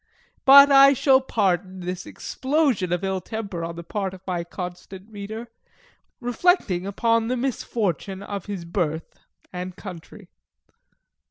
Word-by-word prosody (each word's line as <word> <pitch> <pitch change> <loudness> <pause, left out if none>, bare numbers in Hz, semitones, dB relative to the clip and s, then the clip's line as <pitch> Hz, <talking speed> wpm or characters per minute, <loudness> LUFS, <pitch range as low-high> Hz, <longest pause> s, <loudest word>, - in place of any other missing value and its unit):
But 280 +1 +9
I 275 0 +8
shall 265 0 +4
pardon 190 -6 -1
this 180 0 -5
explosion 265 - -1
of 175 +1 -1
ill 190 -1 -1
temper 200 -4 -5
on 165 0 -5
the 170 - -7
part 190 +1 -4
of 185 - -15
my 180 -2 -2
constant 180 +2 -8
reader, 220 +3 -7 0.7
reflecting 240 - +1
upon 230 +2 +1
the 255 +1 -1
misfortune 205 - -2
of 200 -2 -6
his 195 -4 -5
birth 165 -2 -3 0.3
and 180 0 -5
country. 180 -5 -11
195 Hz, 135 wpm, -24 LUFS, 180-235 Hz, 0.7 s, But